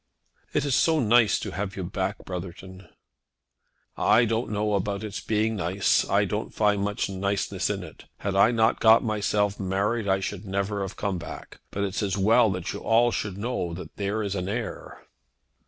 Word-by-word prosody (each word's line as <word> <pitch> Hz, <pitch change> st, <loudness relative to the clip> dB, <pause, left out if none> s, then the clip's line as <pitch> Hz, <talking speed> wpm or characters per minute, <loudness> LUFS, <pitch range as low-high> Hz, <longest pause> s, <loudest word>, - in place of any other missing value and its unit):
"It 145 Hz, -, 0 dB
is 140 Hz, -, 0 dB
so 160 Hz, -1 st, +3 dB
nice 120 Hz, -3 st, +4 dB
to -, -, -4 dB
have 100 Hz, +3 st, -4 dB
you 95 Hz, -, -3 dB
back, 85 Hz, -, -3 dB
Brotherton." 95 Hz, 0 st, -8 dB, 1.1 s
"I 120 Hz, +2 st, +4 dB
don't 115 Hz, +1 st, -1 dB
know 105 Hz, 0 st, 0 dB
about 100 Hz, +1 st, -1 dB
its 105 Hz, -3 st, -5 dB
being 110 Hz, +1 st, 0 dB
nice. 95 Hz, +2 st, +1 dB
I -, -, +3 dB
don't -, -, -3 dB
find 105 Hz, -2 st, +2 dB
much 105 Hz, 0 st, -1 dB
niceness 100 Hz, +1 st, -1 dB
in -, -, -2 dB
it. -, -, -12 dB
Had 100 Hz, -1 st, -3 dB
I 100 Hz, +3 st, +6 dB
not 115 Hz, -1 st, +2 dB
got 110 Hz, +1 st, +6 dB
myself 105 Hz, -2 st, 0 dB
married 100 Hz, +3 st, -1 dB
I 95 Hz, 0 st, +2 dB
should 95 Hz, 0 st, -4 dB
never 100 Hz, +1 st, -2 dB
have 95 Hz, 0 st, -4 dB
come 100 Hz, -4 st, -2 dB
back. -, -, -9 dB
But 100 Hz, -, -3 dB
it's 100 Hz, 0 st, -2 dB
as 100 Hz, -1 st, -1 dB
well 110 Hz, +4 st, +4 dB
that 90 Hz, -2 st, -4 dB
you -, -, -5 dB
all 120 Hz, +1 st, +3 dB
should 105 Hz, -4 st, -3 dB
know 100 Hz, -6 st, -3 dB
that 90 Hz, -, -9 dB
there 105 Hz, +2 st, -2 dB
is 100 Hz, -2 st, -2 dB
an 95 Hz, -1 st, -3 dB
heir." 115 Hz, +2 st, -5 dB
100 Hz, 190 wpm, -26 LUFS, 95-110 Hz, 1.1 s, I